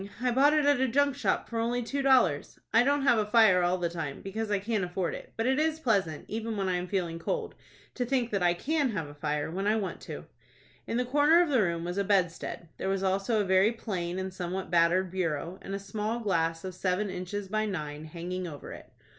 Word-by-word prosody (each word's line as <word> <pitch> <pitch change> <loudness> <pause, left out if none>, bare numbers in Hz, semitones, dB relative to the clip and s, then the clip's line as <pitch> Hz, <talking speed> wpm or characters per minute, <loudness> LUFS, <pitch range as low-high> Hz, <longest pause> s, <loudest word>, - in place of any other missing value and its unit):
I 250 0 +1
bought 280 +4 +5
it 300 -1 +3
at 285 -2 +4
a 265 - +3
junk 280 +2 +2
shop 280 - 0
for 230 - -3
only 240 +2 0
two 275 +4 -2
dollars. 260 - +3 0.2
I 230 - +6
don't 285 +1 +2
have 240 -5 +4
a 210 - +1
fire 210 -5 +5
all 175 +1 +2
the 175 -1 0
time, 160 -5 -5
because 215 +3 -4
I 205 - +2
can't 205 0 -1
afford 180 0 -2
it. - - -8
But 225 - 0
it 265 +2 +2
is 315 0 +1
pleasant, 195 - 0
even 220 0 -3
when 195 -1 -1
I 180 -1 +1
am 180 +1 -4
feeling 175 -4 -2
cold, 465 - -3 0.4
to 250 - -2
think 245 -1 0
that 200 -2 0
I 175 -1 +3
can 290 - 0
have 165 -6 -2
a 145 - -10
fire 150 +1 -2
when 195 +4 -2
I 215 - +3
want 200 -4 -3
to." - - -6 0.6
In 230 - -1
the 250 - +1
corner 295 +6 +5
of 340 - -3
the 260 -5 +3
room 170 -3 0
was 175 +3 -3
a - - +2
bedstead. 180 -3 0
There 190 - -2
was 195 0 0
also 195 +3 +1
a - - -1
very 190 +3 +4
plain, 185 -6 -4
and 190 0 -4
somewhat 185 0 -4
battered, 175 +2 +3
bureau, 170 -1 -2
and 195 - -5
a - - -3
small 210 +3 -3
glass 165 -6 0
of 185 -1 -5
seven 185 +2 -1
inches 185 +2 -5
by 215 +2 0
nine 150 -5 -5
hanging 180 +3 -5
over 145 -4 -8
it. - - -12
195 Hz, 240 wpm, -29 LUFS, 175-235 Hz, 0.6 s, I